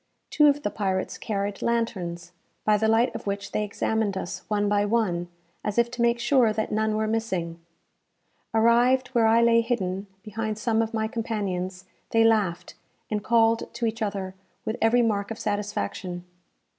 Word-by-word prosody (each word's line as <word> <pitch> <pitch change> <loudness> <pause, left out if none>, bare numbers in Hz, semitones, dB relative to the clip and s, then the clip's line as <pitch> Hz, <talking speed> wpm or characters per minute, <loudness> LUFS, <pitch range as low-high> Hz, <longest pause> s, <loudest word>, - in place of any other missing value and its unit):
Two 300 -1 +5
of 290 0 +2
the 205 - -1
pirates 190 -2 -2
carried 200 -1 -3
lanterns, 180 -7 -2 0.3
by 215 - +4
the 220 +1 +1
light 225 +3 +3
of - - -7
which 200 0 -3
they 215 - 0
examined 210 -1 -1
us 175 - -5
one 205 -1 +1
by 205 0 +2
one, 205 -5 0 0.4
as 210 +1 -3
if 235 0 +3
to 245 - -4
make 235 0 +3
sure 245 -2 +3
that 215 0 -2
none 215 0 +1
were 220 0 0
missing. 190 -7 -2 0.9
Arrived 240 +3 +3
where 235 -3 +3
I 230 +1 +5
lay 230 0 +5
hidden 200 -5 -2 0.2
behind 215 0 -3
some 225 0 +1
of 225 0 -2
my 220 0 0
companions, 195 -5 -3 0.2
they 225 0 +4
laughed, 200 -6 +1 0.4
and 210 -1 -1
called 230 0 +2
to 235 0 -1
each 225 0 -2
other 200 -3 -2 0.3
with 220 - -1
every 235 +2 +4
mark 200 -3 0
of 225 - -5
satisfaction. 185 - -3
215 Hz, 170 wpm, -26 LUFS, 200-230 Hz, 0.9 s, Two